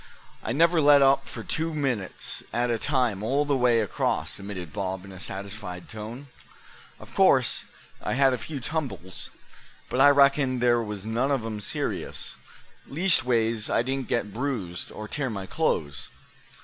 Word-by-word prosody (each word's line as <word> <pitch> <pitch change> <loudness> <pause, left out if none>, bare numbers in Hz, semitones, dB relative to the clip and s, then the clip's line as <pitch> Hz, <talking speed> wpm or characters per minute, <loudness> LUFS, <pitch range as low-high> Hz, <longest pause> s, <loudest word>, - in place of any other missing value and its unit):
"I - - -2
never 165 +5 +4
let 145 -1 +7
up 135 0 +4
for - - -7
two 160 0 -2
minutes 125 -10 -2
at 120 0 0
a 115 - 0
time 125 -8 +1
all 135 +7 +1
the 145 -1 +1
way 120 -3 +4
across," 105 - -1
admitted 95 -4 -7
Bob, 95 -2 -3
in 100 - -11
a 95 - -10
satisfied 95 -1 -6
tone. 110 +5 -7 0.7
"Of - - -13
course - - +4 0.4
I - - -1
had 135 0 +4
a - - 0
few 145 +4 -5
tumbles, 130 - -4 0.6
but 130 - +2
I 145 - +9
reckon 140 -2 +4
there 120 -1 +3
was 105 -3 -5
none 115 +5 0
of 135 -5 0
'em 110 -2 -4
serious; 100 - -3 0.5
leastways 120 - +2
I - - +2
didn't 135 0 -2
get 105 -4 -1
bruised, 115 -9 -3
or 110 - -7
tear 140 +3 -2
my 100 -4 -4
clothes. 75 - -1
120 Hz, 160 wpm, -26 LUFS, 105-140 Hz, 0.7 s, I